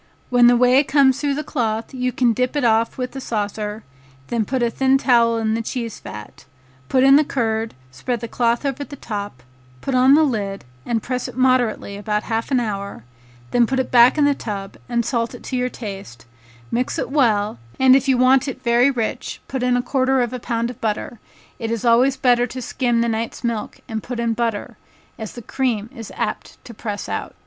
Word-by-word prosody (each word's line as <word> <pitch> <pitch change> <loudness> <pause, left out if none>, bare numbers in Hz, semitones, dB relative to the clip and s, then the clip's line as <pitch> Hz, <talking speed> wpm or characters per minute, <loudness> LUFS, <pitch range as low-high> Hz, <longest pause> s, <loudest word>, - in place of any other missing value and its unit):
When 245 -1 +6
the 245 0 +5
whey 250 +3 +5
comes 275 -2 +3
through 285 -2 0
the 300 - -3
cloth, 225 -6 -2
you 250 -1 -1
can 240 -2 +2
dip 250 +4 -1
it 290 - 0
off 225 -1 +2
with 255 0 -4
a 270 - -5
saucer, 210 -2 -3 0.5
then 230 -2 0
put 255 +2 -1
a 235 - +1
thin 265 +2 +3
towel 235 -3 +3
in 220 -1 0
the 225 - -1
cheese 230 -1 -5
vat, 105 +7 -10 0.4
put 260 -1 +3
in 270 +1 +7
the 305 - +4
curd, 225 -5 -2 0.2
spread 235 - -3
the 230 - -5
cloth 235 +3 0
over 275 +1 -2
the 285 - -9
top, 205 - -6 0.4
put 270 - -3
on 255 +2 +6
the 315 - +5
lid, 205 - -2 0.2
and 230 -2 -1
press 255 -1 -3
it - - -10
moderately 250 -6 +1
about 210 0 -2
half 225 +1 -2
an 265 -3 +2
hour; 200 - -4 0.5
then 240 -1 +3
put 265 +2 0
it 260 - -2
back 245 +3 +6
in 295 - +4
the 285 - +4
tub 200 -6 -6
and 235 -1 0
salt 235 -2 -1
it - - -12
to 260 - -4
your 250 0 0
taste; 195 - -8 0.5
mix 250 +2 -1
it - - -3
well, 215 - +2 0.2
and 260 0 +7
if 275 +1 +2
you 265 -2 +3
want 260 +2 +4
it 270 - -6
very 240 +2 +4
rich 235 -5 -3
put 265 -2 -3
in 250 0 +2
a 245 - -1
quarter 265 0 +1
of 240 +1 -4
a 250 - -4
pound 235 0 -2
of - - -15
butter; 220 +1 -3 0.4
it 225 -2 -3
is 230 0 -2
always 250 +3 +4
better 245 -1 +3
to 250 +2 -7
skim 240 -1 0
the 235 - +1
night's 230 +2 -3
milk 230 -3 -3
and 220 -1 -4
put 245 +1 -6
in 235 -1 0
butter, 225 -2 -3 0.4
as 220 -2 -6
the 240 - -9
cream 230 -4 -2
is 225 -2 -8
apt - - -4
to 235 - -10
press 210 -2 -5
out. - - -4
240 Hz, 215 wpm, -21 LUFS, 220-260 Hz, 0.5 s, in